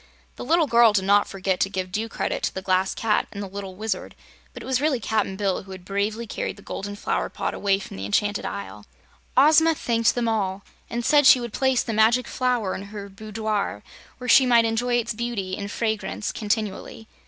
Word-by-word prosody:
The - - -7
little 335 0 +3
girl 235 -4 +5
did 195 -2 +2
not 205 +1 +4
forget 190 -1 -2
to 195 - +1
give 185 -2 -4
due 220 +4 -2
credit - - -3
to - - -1
the 190 - -4
Glass 185 0 +1
Cat 225 -4 +1
and 200 -1 -6
the - - -5
little 195 -1 -7
Wizard, 210 -1 -4 0.4
but - - -10
it - - -9
was 260 0 0
really 290 -4 +1
Cap'n 215 -2 -1
Bill 195 -2 -1
who 190 0 -10
had 185 -1 -11
bravely 205 +4 -2
carried 220 - -4
the 200 - -16
golden 205 +1 -6
flower 205 - -2
pot - - -3
away 195 -1 +1
from 195 - -9
the 95 - -5
enchanted 205 - 0
Isle. 100 +1 -7 0.5
Ozma 315 +4 +6
thanked 230 -4 +1
them 240 -1 0
all, 200 -3 -1 0.3
and 235 0 -3
said 290 -2 +5
she 260 - +8
would 235 -2 -6
place 265 -2 +2
the 230 - -3
Magic 225 +3 +3
Flower 245 -6 0
in 200 - -6
her 200 -1 -8
boudoir 215 - -3 0.3
where 250 - -8
she 260 +1 +6
might 235 -2 +5
enjoy 240 +2 0
its 235 -1 0
beauty 215 -5 -3
and 200 0 -5
fragrance 220 -1 -2
continually. 215 0 -3
215 Hz, 210 wpm, -24 LUFS, 195-235 Hz, 0.5 s, she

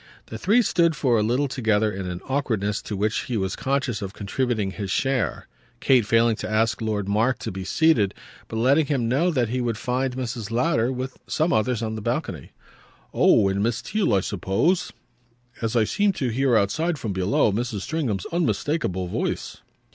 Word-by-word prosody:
The 110 - -8
three 220 - +4
stood 170 -5 +2
for 125 -5 +2
a - - +2
little 125 +7 +1
together 110 -5 +1
in 95 -1 -5
an 90 0 -5
awkwardness 110 -7 -1
to 105 - -5
which 105 +2 0
he 120 - -2
was 95 -1 -1
conscious 135 -5 -1
of 100 0 -5
contributing 110 -1 -1
his 100 -1 -5
share; 130 +5 -1 0.3
Kate 125 -5 +3
failing 115 0 +3
to - - -5
ask 110 +2 +1
Lord 105 -3 -1
Mark 110 +6 +1
to - - -5
be 95 0 -6
seated, 115 - +2 0.3
but - - -7
letting 135 +6 +3
him 135 -6 0
know 140 +9 +2
that 125 -9 0
he 125 +2 -1
would 115 -3 -1
find 125 +2 -1
Mrs. 115 -4 -4
Lowder, 120 0 +1
with 130 0 -5
some 160 +2 +1
others, 115 +1 +1
on 110 -1 -2
the 110 - -5
balcony. 110 - -3 0.6
"Oh 100 - +4
and 95 +1 0
Miss 115 +2 0
Theale 210 - +1
I 95 - +3
suppose? 100 - 0 0.7
as 115 +1 -1
I 115 - +4
seemed 200 - +1
to 130 - -1
hear 125 0 +2
outside, 155 - 0
from 110 -6 -4
below, 95 +3 +2
Mrs. 110 -1 -2
Stringham's 120 - -2
unmistakeable 150 - -1
voice." - - -3
115 Hz, 185 wpm, -24 LUFS, 105-135 Hz, 0.7 s, three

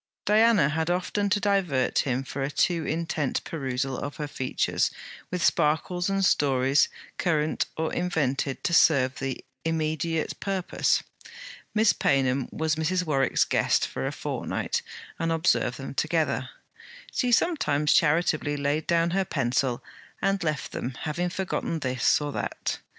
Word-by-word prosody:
Diana 215 -6 +5
had 160 +2 -1
often 185 +3 0
to 205 - +2
divert 190 -11 +1
him 130 -1 0
from 135 +1 -6
a 135 - -1
too 165 +2 +1
intent 160 -3 -1
perusal 135 -3 -3
of 145 - -5
her 150 - -4
features 130 -2 0 0.4
with 180 -3 -1
sparkles 175 +3 +1
and 195 0 +1
stories 135 -3 +3 0.3
current 155 -3 +1
or 160 0 -1
invented 140 -6 -1
to 170 - 0
serve 135 -6 +4
the 135 -1 -4 0.2
immediate 160 0 -1
purpose. 195 -2 0 0.7
Miss 215 0 +5
Paynham 135 -1 +1
was 160 0 -1
Mrs. 180 +3 0
Warwick's 135 -4 +2
guest - - +2
for - - -4
a - - -2
fortnight, - - -3 0.4
and 165 0 0
observed 165 +1 +1
them - - -7
together. - - 0 0.6
She 250 -2 +1
sometimes 150 - +2
charitably 155 -2 +2
laid 145 +2 -1
down 170 0 +2
her 195 +2 +1
pencil 130 -5 -1 0.4
and 195 -2 0
left 155 -3 -2
them, 125 +1 -4
having 175 +4 -1
forgotten 180 -2 -2
this 130 -4 +2
or 145 -1 -3
that. - - -3
155 Hz, 140 wpm, -26 LUFS, 140-175 Hz, 0.7 s, Diana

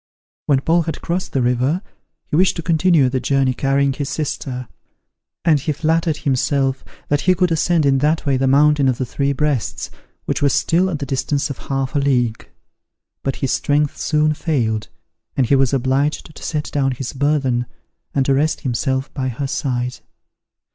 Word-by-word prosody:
When 135 -3 +3
Paul 165 +4 +3
had 160 -2 -5
crossed 175 +2 -2
the 130 - 0
river, 130 - +1 0.4
he 150 - -3
wished 185 +3 +3
to 170 - -4
continue 165 -4 +3
the 130 +1 -1
journey 135 -1 +1
carrying 135 +1 +1
his 140 0 -4
sister: 135 -5 -4 0.8
and 155 -4 +4
he 150 - -2
flattered 160 +1 0
himself 135 -1 0 0.3
that 145 0 +2
he 185 0 +3
could 180 -1 +1
ascend 165 0 +2
in 135 -1 +3
that 155 +4 +1
way 140 -2 +2
the 135 +1 +1
mountain 145 +1 +4
of 130 -2 +1
the 130 - -2
Three 140 +3 -1
Breasts, 140 - -1 0.3
which - - -1
was 140 -2 +3
still 180 +3 +2
at 165 - -2
the 140 - -4
distance 140 +2 -1
of 140 - -7
half 135 0 -1
a - - +3
league; 125 -5 0 0.7
but 135 - -2
his 130 - -1
strength 145 0 +1
soon 155 0 +2
failed, 115 -10 -1 0.5
and 135 - +3
he 140 - +3
was 135 -2 +3
obliged 140 +4 0
to - - -11
set 150 -2 -3
down 135 -2 +1
his 130 0 -5
burthen, 135 -4 +1 0.5
and 135 -1 +2
to 135 - +3
rest 150 +4 +1
himself 130 +1 -1
by 130 -2 -2
her 130 +3 -3
side. 125 -3 -2
140 Hz, 180 wpm, -19 LUFS, 130-150 Hz, 0.8 s, and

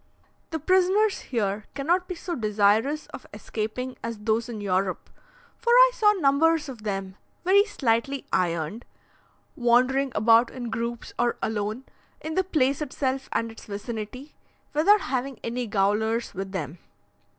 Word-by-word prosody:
The 320 - -2
prisoners 375 +5 +3
here 210 -4 -2
cannot 345 +6 +1
be 365 - -4
so 345 +1 -5
desirous 220 +5 +2
of - - -9
escaping 240 +4 -4
as 230 -1 -4
those 220 +3 -1
in 225 -3 -5
Europe, 190 -1 -1 0.5
for 470 - -2
I - - +8
saw 430 -4 +4
numbers 320 -2 +2
of 250 -5 -8
them, 195 -2 -4 0.3
very 395 +2 +6
slightly 270 - -1
ironed, 170 +4 -1 0.7
wandering 255 +3 +3
about 230 +2 +5
in 245 -3 -6
groups 235 +1 -4
or 240 0 +1
alone, 215 +3 -2 0.4
in 315 - -5
the 375 - +2
place 280 -6 +1
itself 270 -2 -2
and 230 0 -1
its 225 - -13
vicinity, 220 +6 -6 0.4
without 385 +8 +5
having 260 -2 -3
any 240 +1 -3
gaolers 220 +3 0
with 190 +1 -5
them. 165 -3 -5
240 Hz, 140 wpm, -26 LUFS, 215-300 Hz, 0.7 s, I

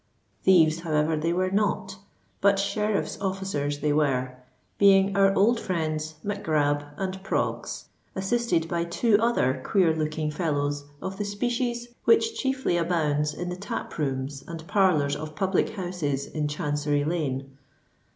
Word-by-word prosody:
Thieves, 165 -4 +5
however, 160 -1 +1
they 160 +2 0
were 185 +1 0
not: 195 -1 0 0.4
but 200 0 +4
sheriff's 200 +1 -1
officers 190 -7 -2
they 150 0 +2
were,—being 135 +8 +1
our 195 0 +5
old 225 +4 +4
friends 155 -6 -2
Mac 205 0 -3
Grab 145 -2 +1
and 190 0 -3
Proggs, 200 - -2 0.3
assisted 190 -4 0
by 170 0 -1
two 205 +5 +2
other 135 - +1
queer 175 -5 +3
looking 155 0 -2
fellows 145 -3 -1 0.2
of 190 0 -4
the - - 0
species 240 +3 -2 0.2
which 450 0 +4
chiefly 265 -9 0
abounds 155 -4 +1
in 175 0 -4
the 180 - -3
tap 205 +5 -5
rooms 135 -1 -2
and 165 -1 -7
parlours 180 -9 +3
of 155 +1 -7
public 190 +5 +1
houses 170 -8 -2
in 150 -1 -2
Chancery 145 -1 -1
Lane. 135 -4 -2
170 Hz, 140 wpm, -26 LUFS, 150-195 Hz, 0.4 s, Thieves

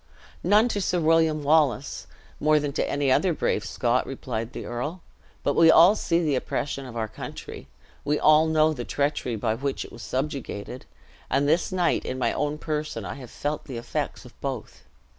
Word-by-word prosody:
"None 210 +6 +5
to 205 - -1
Sir 180 -1 0
William 160 -2 +3
Wallace, 145 -3 +2 0.3
more 155 0 +4
than 145 -1 -3
to - - -1
any 140 -2 +1
other 180 +6 +3
brave 105 - 0
Scot," 120 +3 0
replied 115 -3 -4
the - - -7
earl: 150 +9 -4 0.4
"but 145 - +1
we 165 -1 +6
all 175 +6 +7
see 170 -5 +1
the 150 -3 +1
oppression 135 +1 -2
of 120 -2 -8
our 110 -1 -1
country; 105 -9 -8 0.4
we 150 +1 +1
all 155 +1 +5
know 155 0 +3
the 125 -5 -5
treachery 140 -3 -1
by 110 +1 0
which 135 +4 -3
it - - -13
was 120 - -11
subjugated; 130 -2 -4 0.4
and 140 +2 +2
this 165 +5 +2
night, 180 -2 +1
in 130 - -4
my 130 - +1
own 150 0 -1
person, 150 -8 -3
I 90 - -4
have 130 -3 -10
felt 150 +1 -4
the 130 -4 -6
effects 115 - -4
of - - -13
both. - - -5
145 Hz, 190 wpm, -25 LUFS, 125-155 Hz, 0.4 s, all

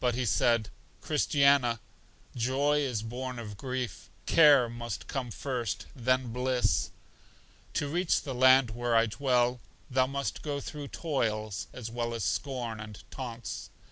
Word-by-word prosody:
But 125 -2 +1
he 125 0 -1
said, 115 -1 +2 0.3
Christiana, 140 -5 +3 0.6
joy 135 +5 +2
is 125 -7 -1
born 125 +2 -5
of 105 -3 -7
grief: 125 -3 -4 0.2
care 145 -6 +6
must 120 0 -5
come 130 -3 -3
first, 120 -3 -3
then 130 -1 0
bliss. 125 0 +1 0.9
To 145 - 0
reach 175 +4 +1
the 135 - -4
land 130 -1 +6
where 120 0 0
I 115 0 +5
dwell, 125 +1 +1 0.3
thou 130 0 +3
must 140 0 -3
go 145 -2 -3
through 145 0 -6
toils, 110 - -2
as 115 -3 -7
well 120 0 -2
as 115 - -3
scorn 120 -1 -2
and 105 -1 -8
taunts. 120 -4 -6
125 Hz, 140 wpm, -30 LUFS, 115-135 Hz, 0.9 s, care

